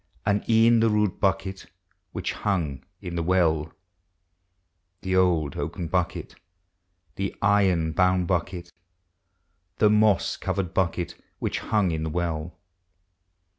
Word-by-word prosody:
And 105 Hz, 0 st, +1 dB
e'en 115 Hz, +1 st, +5 dB
the 115 Hz, 0 st, +3 dB
rude 105 Hz, -2 st, +1 dB
bucket 95 Hz, 0 st, -1 dB, 0.4 s
which -, -, -3 dB
hung 85 Hz, -10 st, -2 dB, 0.2 s
in 85 Hz, -1 st, -6 dB
the 85 Hz, -, -1 dB
well,— 80 Hz, -3 st, +1 dB, 1.3 s
The 95 Hz, 0 st, -1 dB
old 85 Hz, -6 st, +2 dB
oaken 85 Hz, -2 st, -4 dB
bucket, 90 Hz, -1 st, -2 dB, 0.8 s
the 95 Hz, 0 st, -3 dB
iron 95 Hz, -5 st, +2 dB
bound 90 Hz, +1 st, +2 dB
bucket. 85 Hz, 0 st, -3 dB, 1.0 s
The 105 Hz, -1 st, +4 dB
moss 105 Hz, -3 st, +3 dB
covered 95 Hz, -2 st, -3 dB
bucket 90 Hz, -1 st, -1 dB, 0.2 s
which -, -, -2 dB
hung 105 Hz, -5 st, +1 dB
in 80 Hz, -1 st, -2 dB
the 80 Hz, -, -2 dB
well. 80 Hz, 0 st, -3 dB
90 Hz, 120 wpm, -25 LUFS, 85-100 Hz, 1.3 s, e'en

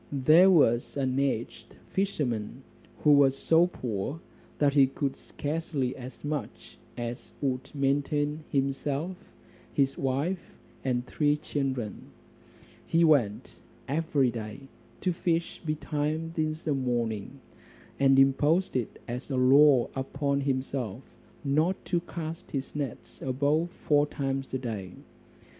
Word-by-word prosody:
There 155 Hz, +7 st, +6 dB
was 135 Hz, -9 st, +3 dB
an 130 Hz, -1 st, 0 dB
aged 115 Hz, -4 st, -2 dB, 0.2 s
fisherman, 135 Hz, -, -2 dB, 0.4 s
who 150 Hz, -, +6 dB
was 140 Hz, -2 st, +5 dB
so 165 Hz, +4 st, +4 dB
poor, 125 Hz, -, -4 dB, 0.4 s
that 145 Hz, -2 st, +3 dB
he 140 Hz, -2 st, +6 dB
could 135 Hz, 0 st, -2 dB
scarcely 145 Hz, -4 st, -3 dB
as 130 Hz, 0 st, -10 dB
much 145 Hz, -2 st, -5 dB, 0.2 s
as 120 Hz, +1 st, -5 dB
would 135 Hz, -1 st, -2 dB
maintain 145 Hz, +2 st, 0 dB
himself, 140 Hz, +5 st, -1 dB, 0.6 s
his 135 Hz, -1 st, +1 dB
wife, 145 Hz, +8 st, -2 dB, 0.3 s
and 125 Hz, -2 st, 0 dB
three 145 Hz, +2 st, +1 dB
children. 135 Hz, -7 st, -3 dB, 0.8 s
He 165 Hz, +1 st, +3 dB
went 130 Hz, -11 st, +2 dB, 0.3 s
every 145 Hz, -3 st, +1 dB
day 110 Hz, +2 st, -6 dB, 0.4 s
to 180 Hz, -, +1 dB
fish 170 Hz, -1 st, -1 dB
betimes 155 Hz, +1 st, -2 dB
in 155 Hz, -1 st, 0 dB
the 155 Hz, -, +1 dB
morning; 120 Hz, -2 st, -2 dB, 0.6 s
and 135 Hz, -1 st, +5 dB
imposed 145 Hz, +7 st, +3 dB
it 125 Hz, -4 st, -2 dB
as 125 Hz, +4 st, -5 dB
a 135 Hz, -, -1 dB
law 135 Hz, 0 st, +6 dB
upon 140 Hz, +1 st, -1 dB
himself, 130 Hz, -4 st, -2 dB, 0.4 s
not 155 Hz, +6 st, +2 dB
to 175 Hz, -, +1 dB
cast 170 Hz, 0 st, -6 dB
his 135 Hz, 0 st, -4 dB
nets 140 Hz, -5 st, -5 dB
above 145 Hz, +6 st, +1 dB
four 150 Hz, -4 st, +1 dB
times 135 Hz, -2 st, -3 dB
a 130 Hz, -, 0 dB
day. 105 Hz, -8 st, -5 dB
140 Hz, 120 wpm, -28 LUFS, 130-155 Hz, 0.8 s, There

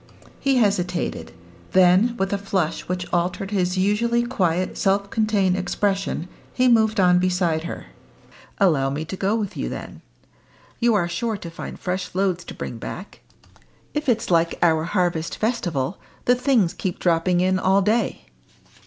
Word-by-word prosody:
He 275 Hz, -1 st, +2 dB
hesitated; 185 Hz, -6 st, 0 dB, 0.4 s
then, 185 Hz, +6 st, +4 dB
with 195 Hz, +1 st, -1 dB
a 200 Hz, -, 0 dB
flush 190 Hz, -5 st, -2 dB
which 180 Hz, 0 st, -2 dB
altered 180 Hz, +3 st, -1 dB
his 180 Hz, -2 st, 0 dB
usually 230 Hz, +5 st, +2 dB
quiet, 185 Hz, -7 st, 0 dB
self 200 Hz, 0 st, 0 dB
contained 210 Hz, -4 st, +2 dB
expression, 195 Hz, -1 st, -1 dB, 0.2 s
he 255 Hz, 0 st, +2 dB
moved 220 Hz, -2 st, +3 dB
on 180 Hz, -1 st, +5 dB
beside 180 Hz, -3 st, 0 dB
her. -, -, -6 dB, 0.7 s
"Allow 155 Hz, -9 st, +3 dB
me 145 Hz, +3 st, -3 dB
to 165 Hz, -, -5 dB
go 195 Hz, +3 st, 0 dB
with 210 Hz, -4 st, -3 dB
you -, -, -3 dB
then. -, -, -8 dB, 0.8 s
You 235 Hz, -1 st, +3 dB
are 175 Hz, -4 st, +1 dB
sure 215 Hz, +6 st, -2 dB
to 170 Hz, -3 st, -8 dB
find 165 Hz, -, -7 dB
fresh 180 Hz, 0 st, -4 dB
loads 185 Hz, -2 st, 0 dB
to -, -, -9 dB
bring 115 Hz, -, -6 dB
back. 185 Hz, -, -8 dB, 0.7 s
If 300 Hz, -2 st, -1 dB
it's 230 Hz, -4 st, 0 dB
like 165 Hz, 0 st, +2 dB
our 160 Hz, -2 st, +3 dB
harvest 175 Hz, -3 st, -1 dB
festival, 180 Hz, -, -1 dB, 0.3 s
the 245 Hz, -, +5 dB
things 250 Hz, -8 st, +2 dB
keep 185 Hz, -2 st, -3 dB
dropping 175 Hz, +1 st, +2 dB
in 185 Hz, +1 st, +2 dB
all 190 Hz, +1 st, +3 dB
day." 215 Hz, -, 0 dB
185 Hz, 155 wpm, -23 LUFS, 175-210 Hz, 0.8 s, on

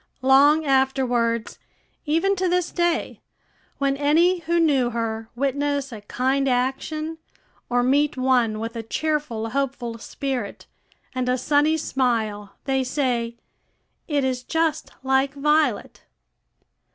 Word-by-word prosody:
Long 285 Hz, +4 st, +5 dB
afterwards, 255 Hz, -4 st, +1 dB, 0.5 s
even 330 Hz, +6 st, +2 dB
to 370 Hz, 0 st, +1 dB
this 360 Hz, -1 st, 0 dB
day, 345 Hz, -1 st, -1 dB, 0.6 s
when 275 Hz, -1 st, +1 dB
any 325 Hz, +6 st, +3 dB
who 340 Hz, +1 st, 0 dB
knew 275 Hz, -7 st, +3 dB
her 225 Hz, -1 st, -3 dB
witness 280 Hz, +1 st, -1 dB
a 220 Hz, -3 st, -8 dB
kind 265 Hz, +6 st, 0 dB
action, 305 Hz, +6 st, -2 dB, 0.5 s
or 245 Hz, 0 st, +2 dB
meet 280 Hz, +3 st, +2 dB
one 250 Hz, -4 st, +2 dB
with 230 Hz, +1 st, -5 dB
a 230 Hz, -, -3 dB
cheerful, 235 Hz, -3 st, -2 dB
hopeful 250 Hz, -4 st, -2 dB
spirit, 255 Hz, -5 st, -4 dB, 0.5 s
and 255 Hz, -1 st, -1 dB
a 250 Hz, -, +2 dB
sunny 295 Hz, +4 st, +2 dB
smile, 220 Hz, -8 st, -1 dB
they 265 Hz, -1 st, +1 dB
say, 245 Hz, -3 st, -1 dB, 0.7 s
"It 290 Hz, -4 st, 0 dB
is 255 Hz, -1 st, -1 dB
just 320 Hz, +2 st, -1 dB
like 265 Hz, +1 st, +1 dB
Violet." 300 Hz, -5 st, +1 dB
270 Hz, 120 wpm, -23 LUFS, 245-300 Hz, 0.7 s, Long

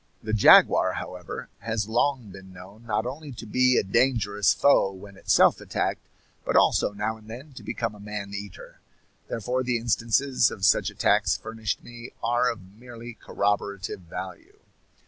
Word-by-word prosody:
The 110 Hz, -, -4 dB
jaguar, 110 Hz, -, +6 dB
however, 90 Hz, -2 st, -7 dB
has 110 Hz, -2 st, -3 dB
long 120 Hz, -1 st, 0 dB
been 95 Hz, 0 st, -12 dB
known 95 Hz, +6 st, -14 dB
not 110 Hz, 0 st, -1 dB
only 140 Hz, +4 st, -6 dB
to 115 Hz, -, -9 dB
be 125 Hz, +3 st, +3 dB
a -, -, +3 dB
dangerous 105 Hz, -2 st, +2 dB
foe 140 Hz, -8 st, +3 dB
when 95 Hz, +1 st, -12 dB
itself -, -, +3 dB
attacked, -, -, -3 dB, 0.4 s
but -, -, -2 dB
also -, -, +3 dB
now 105 Hz, +2 st, -3 dB
and 110 Hz, -1 st, -18 dB
then 130 Hz, +6 st, -10 dB
to -, -, -10 dB
become 115 Hz, -2 st, -3 dB
a 105 Hz, -, -14 dB
man 105 Hz, -1 st, -6 dB
eater. 100 Hz, -1 st, -9 dB, 0.5 s
Therefore 125 Hz, +3 st, -2 dB
the 125 Hz, -1 st, 0 dB
instances 115 Hz, +3 st, +1 dB
of 95 Hz, -, -3 dB
such -, -, +3 dB
attacks -, -, +2 dB
furnished 110 Hz, -1 st, -4 dB
me 120 Hz, 0 st, -11 dB
are 120 Hz, +1 st, +2 dB
of 95 Hz, -5 st, -12 dB
merely 120 Hz, -1 st, -10 dB
corroborative 100 Hz, -3 st, -2 dB
value. 90 Hz, +1 st, -9 dB
110 Hz, 160 wpm, -25 LUFS, 100-120 Hz, 0.5 s, jaguar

